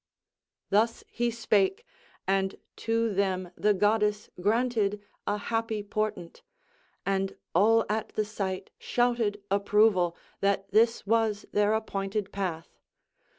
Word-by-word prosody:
Thus 225 +3 +2
he 240 0 0
spake, 230 - +1 0.4
and 195 0 +1 0.2
to 230 -1 0
them 185 -2 0
the 210 -1 +2
goddess 210 +1 +1
granted 215 -1 +1 0.3
a 205 - +1
happy 225 0 -2
portent, 210 -4 -3 0.6
and 195 0 -1 0.2
all 225 +5 +4
at 215 +1 -1
the 215 - +1
sight 195 -3 -4
shouted 235 -4 0
approval, 200 -3 +3 0.2
that 195 0 0
this 225 +2 +3
was 220 -1 +1
their 210 +1 +3
appointed 200 -1 -2
path. 175 -5 -4
210 Hz, 110 wpm, -28 LUFS, 195-225 Hz, 0.6 s, all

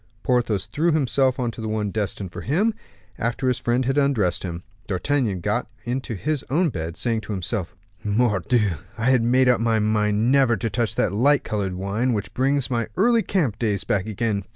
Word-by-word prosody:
Porthos 120 -7 +1
threw 170 +3 0
himself 135 -3 +2
into 120 -3 -3
the 110 - -3
one 105 -2 -1
destined 100 -3 -3
for - - -7
him, 195 - +1 0.5
after 120 +3 -1
his 125 -2 +1
friend 120 +2 0
had 135 +3 +2
undressed 115 -11 +1
him. 85 -1 -5 0.2
D'Artagnan 100 0 0
got - - -1 0.2
into 125 -1 -3
his 150 - -2
own 165 +5 +2
bed, 80 - -5
saying 115 -2 0
to 105 0 -5
himself, 95 0 -3 0.3
"Mordioux! 105 -2 +1 0.2
I 115 +3 +2
had 125 -2 +4
made 125 +3 +3
up 125 -2 +4
my 115 -1 +2
mind 105 +2 +2
never 135 -4 +4
to 110 +3 -2
touch 115 0 -1
that - - +1
light 140 +7 +3
colored 100 -4 -2
wine, 100 +7 -1
which 105 -3 -3
brings 135 0 +1
my 115 -2 0
early 230 +3 +4
camp 155 - 0
days 105 -4 0
back 100 0 0
again. 110 -2 -1
115 Hz, 190 wpm, -23 LUFS, 105-130 Hz, 0.5 s, had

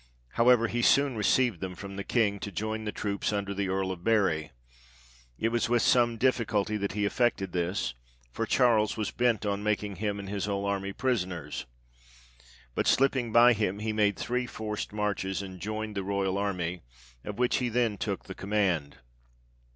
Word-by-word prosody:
However, 115 - +4
he 120 +2 -1
soon 140 +1 +4
received 115 -1 +2
them 90 0 -5
from 100 +1 -8
the 100 - -4
King, 100 -2 +1
to 100 - -5
join 110 +4 -3
the 105 - -2
troops 100 -1 -2
under 100 -1 -2
the 100 0 -1
Earl 95 0 0
of 90 -2 -7
Bury. 95 -9 +2 0.9
It 115 - +1
was 120 +1 0
with 120 -1 +3
some 120 -2 +3
difficulty 110 -4 +1
that 100 -2 -2
he 105 0 0
effected 100 -4 +1
this, 85 -7 -1 0.4
for - - -3
Charles 115 -5 +3
was 110 - -2
bent 120 -3 +1
on 100 0 -1
making 105 -2 -1
him 105 +1 -2
and 100 -1 -7
his 100 0 -2
whole 100 -1 -2
army 100 -1 -1
prisoners. 95 - -2 1.1
But - - -1
slipping 130 -3 +2
by 120 +2 +7
him, 105 -3 -1
he 110 +1 -2
made 105 -2 +2
three 125 0 -1
forced 105 -2 -4
marches, 100 -2 -2
and 95 -1 -8
joined 110 +2 -4
the 100 - -1
royal 100 0 -1
army, 90 -4 -2 0.4
of 105 - -6
which 125 0 +2
he 125 -2 0
then 115 -4 0
took - - -2
the - - -8
command. 95 -8 -1
105 Hz, 180 wpm, -29 LUFS, 95-115 Hz, 1.1 s, by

